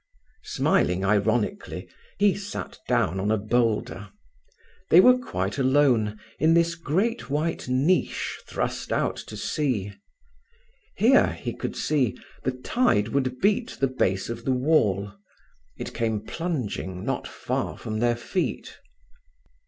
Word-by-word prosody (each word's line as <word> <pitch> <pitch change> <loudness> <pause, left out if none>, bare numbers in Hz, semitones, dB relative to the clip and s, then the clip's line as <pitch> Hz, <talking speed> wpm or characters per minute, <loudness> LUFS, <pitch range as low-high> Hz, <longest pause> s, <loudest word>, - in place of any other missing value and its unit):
Smiling 90 +2 +1
ironically, 105 +2 0 0.3
he 200 0 +4
sat 205 0 -6
down 95 +4 +1
on 100 +2 -1
a 110 - +3
boulder. 110 -2 0 0.8
They 170 - +8
were 250 +6 +8
quite 95 - -3
alone, 130 -6 +3 0.2
in 160 +3 +4
this 170 0 +3
great 180 - -1
white 155 +2 -1
niche 140 +9 +1
thrust - - -3
out - - +1
to - - -8
sea. 115 -10 -1 1.0
Here, 255 +5 +5
he - - -5
could - - -5
see, 130 -10 0 0.3
the 130 - +1
tide 125 - +1
would 130 -1 -1
beat 215 +5 +1
the 135 - +3
base 95 -7 0
of 115 0 -6
the 130 - +1
wall. 110 -8 +2 0.7
It - - -6
came 110 -2 0
plunging 110 - -4
not - - -2
far - - -3
from 110 0 -4
their 120 0 +2
feet. 175 +10 -3
125 Hz, 130 wpm, -25 LUFS, 105-165 Hz, 1.0 s, They